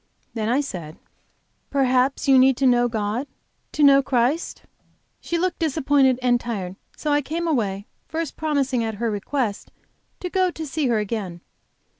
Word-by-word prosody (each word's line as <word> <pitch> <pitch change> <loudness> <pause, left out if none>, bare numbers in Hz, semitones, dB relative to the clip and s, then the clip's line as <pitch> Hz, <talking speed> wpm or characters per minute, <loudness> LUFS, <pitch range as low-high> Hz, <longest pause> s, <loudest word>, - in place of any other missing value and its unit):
Then 220 -1 -2
I 260 +4 +2
said: 170 - -7 0.7
"Perhaps 265 0 +1
you 265 -1 +6
need 260 -1 +5
to 275 - +1
know 245 -1 +4
God, 225 +3 -2 0.5
to 300 - +1
know 275 -1 +7
Christ?" 265 +5 0 0.6
She 340 - -2
looked 360 +1 -1
disappointed 285 -4 +2
and 245 -1 +3
tired. 195 -7 -5 0.2
So 300 - -2
I 290 0 +3
came 330 +5 -3
away, 205 -10 -1 0.2
first 325 -2 -4
promising, 275 -6 0
at 220 -1 -3
her 230 +2 -1
request, 210 +1 -3 0.5
to 360 - -4
go 370 0 +1
to 320 -2 -6
see 295 0 -1
her 235 -2 +2
again. 200 -5 -4
260 Hz, 160 wpm, -23 LUFS, 225-290 Hz, 0.7 s, know